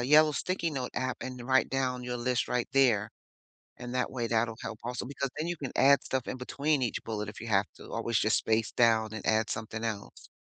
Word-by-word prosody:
yellow 150 Hz, +4 st, +6 dB
sticky 170 Hz, 0 st, -1 dB
note 130 Hz, -4 st, -3 dB
app 130 Hz, -1 st, -2 dB
and 130 Hz, -1 st, -6 dB
write 130 Hz, 0 st, +4 dB
down 130 Hz, -2 st, -1 dB
your 125 Hz, 0 st, -3 dB
list 120 Hz, 0 st, 0 dB
right 125 Hz, -1 st, 0 dB
there. 120 Hz, -7 st, +3 dB, 0.7 s
And 120 Hz, 0 st, -7 dB
that 125 Hz, -, +1 dB
way, 120 Hz, -3 st, -2 dB
that'll 115 Hz, 0 st, +1 dB
help 110 Hz, -, -5 dB
also 125 Hz, +1 st, -3 dB
because 140 Hz, -1 st, -3 dB
then 155 Hz, -, -2 dB
you 175 Hz, -, -2 dB
can 135 Hz, -4 st, -5 dB
add 140 Hz, +1 st, +6 dB
stuff 130 Hz, -2 st, -2 dB
in -, -, -3 dB
between 140 Hz, +3 st, 0 dB
each 120 Hz, -, -1 dB
bullet 105 Hz, -2 st, -3 dB
if 105 Hz, -, -8 dB
you 115 Hz, -, -6 dB
have 100 Hz, -1 st, +3 dB
to -, -, -12 dB
always 115 Hz, -1 st, 0 dB
just 110 Hz, -, +3 dB
space 110 Hz, 0 st, +1 dB
down 110 Hz, -2 st, +4 dB
and 110 Hz, -, -6 dB
add 110 Hz, 0 st, +2 dB
something 110 Hz, 0 st, -4 dB
else. 105 Hz, -3 st, -5 dB
125 Hz, 225 wpm, -30 LUFS, 110-135 Hz, 0.7 s, yellow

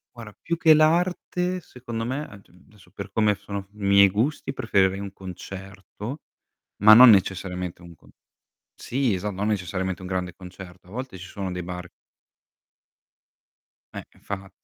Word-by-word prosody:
Guarda, 115 Hz, -3 st, -10 dB
più 170 Hz, -, -1 dB
che 160 Hz, -1 st, +6 dB
l'arte 180 Hz, +3 st, +1 dB
secondo 120 Hz, -7 st, -6 dB
me 135 Hz, +5 st, -3 dB
ad 100 Hz, -7 st, -14 dB, 0.2 s
adesso 100 Hz, -4 st, -21 dB
per 100 Hz, 0 st, -8 dB
come 105 Hz, 0 st, +2 dB
sono 100 Hz, -1 st, -7 dB
i 105 Hz, -1 st, -10 dB
miei 100 Hz, 0 st, +6 dB
gusti 130 Hz, +8 st, -1 dB
preferire 95 Hz, -6 st, +1 dB
un 100 Hz, -1 st, -6 dB
concerto, 95 Hz, -, -9 dB, 0.6 s
ma 105 Hz, +1 st, +9 dB
non 125 Hz, +3 st, +10 dB
necessariamente 90 Hz, -3 st, 0 dB
un 85 Hz, -1 st, -13 dB
con -, -, -22 dB, 0.6 s
sì 125 Hz, -3 st, -1 dB
esa 100 Hz, +3 st, -3 dB
non 100 Hz, +2 st, -3 dB
necessariamente 95 Hz, -2 st, -2 dB
un 90 Hz, -, -7 dB
grande 90 Hz, -2 st, -3 dB
concerto. 90 Hz, 0 st, -12 dB
A -, -, -15 dB
volte 125 Hz, -2 st, -6 dB
ci 90 Hz, -, -9 dB
sono 95 Hz, +1 st, -5 dB
dei 90 Hz, -, -4 dB
bar 90 Hz, 0 st, -7 dB, 2.1 s
Eh, -, -, -6 dB, 0.2 s
infa 100 Hz, -1 st, -7 dB
100 Hz, 150 wpm, -24 LUFS, 95-115 Hz, 2.1 s, non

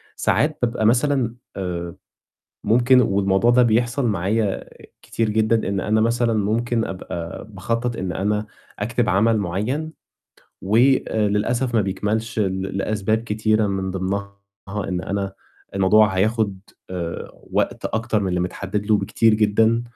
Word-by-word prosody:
ساعات 150 Hz, +2 st, +1 dB
بابقى 115 Hz, -2 st, 0 dB
مثلًا 125 Hz, 0 st, +2 dB, 0.2 s
آآ 85 Hz, -3 st, -4 dB, 0.7 s
ممكن 125 Hz, +3 st, +5 dB
والموضوع 100 Hz, +2 st, +2 dB
ده 125 Hz, 0 st, +5 dB
بيحصل 120 Hz, +3 st, +1 dB
معايا 100 Hz, +1 st, 0 dB, 0.4 s
كتير 115 Hz, -1 st, -2 dB
جدًا، 110 Hz, 0 st, +1 dB
إن 100 Hz, -, -1 dB
أنا 110 Hz, +3 st, +1 dB
مثلًا 115 Hz, 0 st, +2 dB
ممكن 110 Hz, +2 st, 0 dB
أبقى 85 Hz, -3 st, -6 dB
باخطّط 115 Hz, +4 st, -2 dB
إن 95 Hz, -1 st, -3 dB
أنا 105 Hz, +3 st, -1 dB, 0.3 s
أكتب 115 Hz, +2 st, 0 dB
عمل 110 Hz, +3 st, +3 dB
معيّن، 110 Hz, -, -2 dB, 0.7 s
وللأسف 115 Hz, +1 st, +2 dB
ما 110 Hz, -, +4 dB
بيكملش 105 Hz, +4 st, -2 dB
ل 95 Hz, -2 st, 0 dB, 0.2 s
لأسباب 110 Hz, +2 st, 0 dB
كتيرة 110 Hz, 0 st, +1 dB
من 95 Hz, -1 st, -2 dB
ضمنها 100 Hz, +2 st, -3 dB, 0.4 s
إن 95 Hz, -3 st, -3 dB
أنا 100 Hz, 0 st, -3 dB, 0.4 s
الموضوع 100 Hz, +1 st, +4 dB
هياخد 105 Hz, -1 st, +1 dB, 0.3 s
آآ 85 Hz, -2 st, -5 dB, 0.2 s
وقت -, -, -1 dB
أكتر 110 Hz, -1 st, 0 dB
من 95 Hz, -, -1 dB
اللي 90 Hz, -1 st, 0 dB
متحدّد 95 Hz, +3 st, -3 dB
له 110 Hz, 0 st, +4 dB
بكتير 115 Hz, -1 st, +2 dB
جدًا، 110 Hz, +2 st, +3 dB
110 Hz, 130 wpm, -22 LUFS, 95-115 Hz, 0.7 s, ممكن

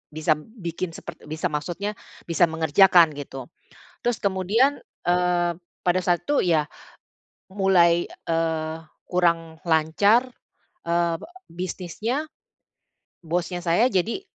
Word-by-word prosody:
bisa 155 Hz, 0 st, 0 dB
bikin 170 Hz, -2 st, -6 dB
sepert -, -, -9 dB
bisa 155 Hz, +3 st, -2 dB
maksudnya 175 Hz, +7 st, -3 dB, 0.4 s
bisa 170 Hz, +1 st, +4 dB
mengerjakan 165 Hz, +1 st, +5 dB
gitu. 135 Hz, -3 st, -8 dB, 0.6 s
Terus 240 Hz, -2 st, 0 dB
kemudian, 205 Hz, +8 st, +2 dB, 0.3 s
eee, 175 Hz, -1 st, +2 dB, 0.3 s
pada 180 Hz, +1 st, +2 dB
saat 175 Hz, -1 st, +1 dB
itu 290 Hz, -, +2 dB
ya, 160 Hz, -4 st, +3 dB, 0.9 s
mulai, 175 Hz, -3 st, +4 dB, 0.2 s
eee, 160 Hz, -1 st, -1 dB, 0.3 s
kurang 170 Hz, -2 st, 0 dB
lancar, 200 Hz, +10 st, +3 dB, 0.6 s
eee, 170 Hz, 0 st, +1 dB
be -, -, -9 dB, 0.3 s
bisnisnya, 185 Hz, -, -3 dB, 1.0 s
bosnya 175 Hz, +2 st, -2 dB
saya 175 Hz, +9 st, +3 dB
jadi 210 Hz, -, 0 dB
175 Hz, 105 wpm, -24 LUFS, 165-190 Hz, 1.0 s, mengerjakan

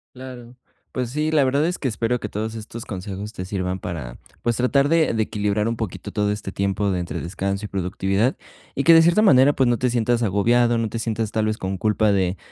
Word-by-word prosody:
Claro, 125 Hz, -1 st, -10 dB, 0.4 s
pues 125 Hz, -2 st, -2 dB
sí, 150 Hz, +3 st, -1 dB
la 155 Hz, -3 st, +3 dB
verdad 140 Hz, +3 st, +2 dB
es 180 Hz, -, -2 dB
que 135 Hz, -, -2 dB
espero 115 Hz, +2 st, -1 dB
que 105 Hz, -, -4 dB
todos 110 Hz, +2 st, -4 dB
estos 115 Hz, +1 st, -8 dB
consejos 100 Hz, +2 st, -6 dB
te 90 Hz, -, -5 dB
sirvan 95 Hz, -1 st, -3 dB
para, 70 Hz, -9 st, -6 dB, 0.3 s
pues, 120 Hz, -1 st, +1 dB
tratar 140 Hz, +3 st, +2 dB
de 160 Hz, -3 st, +2 dB
de 110 Hz, -1 st, +1 dB
equilibrar 105 Hz, 0 st, -1 dB
un 115 Hz, -, -1 dB
poquito 95 Hz, -6 st, -5 dB
todo 105 Hz, -1 st, +1 dB
este 105 Hz, -2 st, -5 dB
tiempo 100 Hz, +1 st, 0 dB
de 90 Hz, -2 st, -1 dB
entre 85 Hz, -, -4 dB
descanso 100 Hz, +3 st, -3 dB
y -, -, -4 dB
productividad, 95 Hz, +5 st, -1 dB, 0.4 s
y 140 Hz, -, -1 dB
que 165 Hz, -, +8 dB
de 165 Hz, -, +8 dB
cierta 170 Hz, +6 st, +4 dB
manera, 135 Hz, -8 st, +6 dB
pues, 130 Hz, -3 st, +1 dB
no 120 Hz, -, +2 dB
te 125 Hz, +3 st, 0 dB
sientas 120 Hz, 0 st, +1 dB
agobiado, 115 Hz, +4 st, +2 dB
no 115 Hz, -1 st, 0 dB
te 115 Hz, +2 st, -5 dB
sientas 110 Hz, -1 st, -2 dB
tal 110 Hz, -1 st, +1 dB
vez 110 Hz, +1 st, -1 dB
con 95 Hz, 0 st, -3 dB
culpa 105 Hz, +1 st, +2 dB
de, 95 Hz, -1 st, 0 dB
110 Hz, 230 wpm, -22 LUFS, 100-125 Hz, 0.4 s, que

